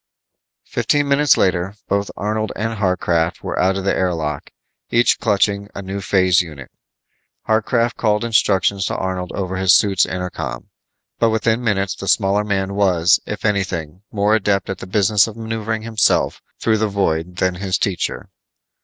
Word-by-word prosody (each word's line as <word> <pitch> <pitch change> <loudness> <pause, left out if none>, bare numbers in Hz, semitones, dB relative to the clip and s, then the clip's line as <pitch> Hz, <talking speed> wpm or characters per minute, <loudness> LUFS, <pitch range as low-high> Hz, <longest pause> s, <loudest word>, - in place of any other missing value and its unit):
Fifteen 145 -1 0
minutes 140 0 +4
later, 95 +1 0
both 100 0 0
Arnold 110 +1 -2
and 115 +2 -2
Harcraft 90 -4 0
were - - -3
out 95 +2 +2
of 95 - -4
the 100 - +1
air 90 -2 0
lock, 75 -3 -4 0.4
each 120 +1 +3
clutching 100 -2 +1
a 100 - -6
new 95 +1 -5
phase 95 -2 +3
unit. 75 -6 -10 0.8
Harcraft 115 +2 +1
called 105 -1 +1
instructions 100 -3 +2
to - - -2
Arnold 95 -1 -3
over 95 -1 -3
his 95 0 +5
suit's 100 -3 +3
inter 90 -1 -4
com, - - -6 0.5
but 115 - +3
within 110 +2 0
minutes 100 -4 0
the 100 - -8
smaller 100 0 +2
man 95 -2 -1
was, 95 -3 +3
if 105 - -5
anything, 95 -5 -2
more 105 0 +1
adept 100 -3 +1
at 95 - -6
the - - -8
business 100 +2 +3
of 110 0 -9
maneuvering 110 -1 -3
himself 110 -1 +1 0.2
through 110 -1 +1
the 110 - +1
void 90 -4 -1
than 90 +1 0
his 95 +1 -2
teacher. 95 -3 -2
100 Hz, 165 wpm, -19 LUFS, 95-110 Hz, 0.8 s, his